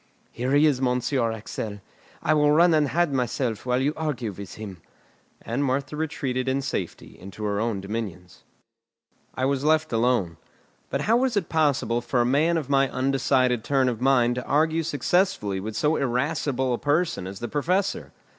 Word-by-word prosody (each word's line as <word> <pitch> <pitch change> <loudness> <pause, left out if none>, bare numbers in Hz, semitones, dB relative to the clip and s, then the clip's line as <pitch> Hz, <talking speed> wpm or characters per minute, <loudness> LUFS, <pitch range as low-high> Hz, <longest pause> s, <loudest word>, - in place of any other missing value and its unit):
"Here 125 +3 -2
he 145 +2 +5
is, 140 -4 +2
Monsieur 125 -1 +1
Axel; 110 -1 -6 0.4
I 155 - +3
will 150 -1 +3
run 170 +3 +5
and 150 -2 +3
hide 170 0 +1
myself 125 -3 -2
while 125 0 +2
you 140 +3 +1
argue 135 -8 -3
with 100 0 -9
him." 100 -6 -8 0.6
And 120 +5 -2
Martha 135 +2 -1
retreated 135 -5 -2
in 135 +1 0
safety 95 -10 -5
into 95 +3 -9
her 100 -1 -1
own 110 -3 -1
dominions. 95 -4 -6 0.9
I 130 - 0
was 135 0 0
left 155 -2 +2
alone. 115 -8 +1 0.5
But - - -1
how 225 +2 +3
was 250 -3 +1
it 190 - -1
possible 140 -6 +1
for 125 +1 -1
a - - +2
man 155 +7 +2
of 150 -5 -3
my 135 -1 +3
undecided 130 -2 +1
turn 135 -2 +2
of 120 -2 -2
mind 125 -2 +3
to 125 - -4
argue 160 +3 +2
successfully 150 - 0
with 105 +3 -6
so 150 +5 +2
irascible 130 0 0
a 120 - -2
person 150 - 0
as 95 +1 -7
the 120 - -4
Professor? 180 +8 -1
130 Hz, 175 wpm, -25 LUFS, 115-150 Hz, 0.9 s, he